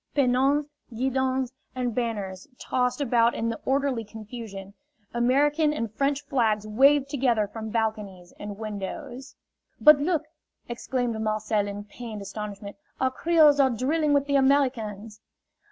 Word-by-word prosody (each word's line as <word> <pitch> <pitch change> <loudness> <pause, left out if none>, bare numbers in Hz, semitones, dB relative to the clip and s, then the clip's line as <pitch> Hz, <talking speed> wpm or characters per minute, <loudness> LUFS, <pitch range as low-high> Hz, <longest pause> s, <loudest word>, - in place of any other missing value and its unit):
Pennons, 275 +2 +3 0.3
guidons 260 +1 -1 0.2
and 250 -2 -2
banners 205 -6 -3
tossed 250 +1 -1
about 235 -3 +3
in 230 - -1
the 230 - -4
orderly 270 -3 0
confusion; 215 -2 -9 0.4
American 290 +6 +2
and 230 -8 -3
French 280 +3 -1
flags 220 -6 +1
waved 275 +6 +4
together 245 -7 +1
from 220 +1 -7
balconies 210 -5 -3
and 205 -1 -7
windows. 220 +5 -6 0.4
"But, 300 -1 +8
look!" 315 0 0 0.4
exclaimed 240 -1 -2
Marcel 215 -1 0
in 205 0 -6
pained 215 0 -8
astonishment, 200 0 -7 0.2
"our 260 0 +1
Creoles 305 0 +4
are 270 -1 +5
drilling 290 +6 0
with 285 -1 +3
the 280 -1 +2
Americans!" 225 -7 0
240 Hz, 130 wpm, -26 LUFS, 215-275 Hz, 0.4 s, But